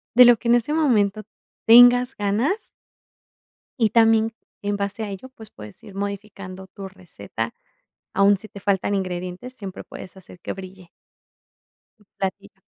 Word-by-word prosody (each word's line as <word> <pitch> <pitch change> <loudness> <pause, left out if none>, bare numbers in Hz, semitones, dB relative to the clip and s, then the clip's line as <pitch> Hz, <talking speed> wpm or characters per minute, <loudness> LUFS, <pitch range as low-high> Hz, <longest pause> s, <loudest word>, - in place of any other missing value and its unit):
de 250 - +9
lo 240 -1 +7
que 235 - -6
en 240 - +6
ese 240 +6 0
momento 215 -9 +2 0.4
tengas 245 +2 +7
ganas. 220 - -1 1.1
Y 220 -3 +3
también 225 -1 +4 0.3
en 205 0 -1
base 200 +2 -3
a 205 - -4
ello, 200 +7 -8
pues, 220 -5 -14
puedes 105 -1 -13
ir 200 - -12
modificando 195 -1 -6
tu 195 0 -9
receta. 115 - -7 0.6
Aún 200 +1 +4
si 215 +3 -9
te 200 - -11
faltan 200 0 0
ingredientes, 185 +5 -4
siempre 195 -5 -8
puedes 185 - -11
hacer 180 -1 -15
que - - -5
brille. 185 -2 -11 1.1
Tu 210 - -26
platillo. 190 -1 -5
200 Hz, 150 wpm, -22 LUFS, 190-225 Hz, 1.1 s, de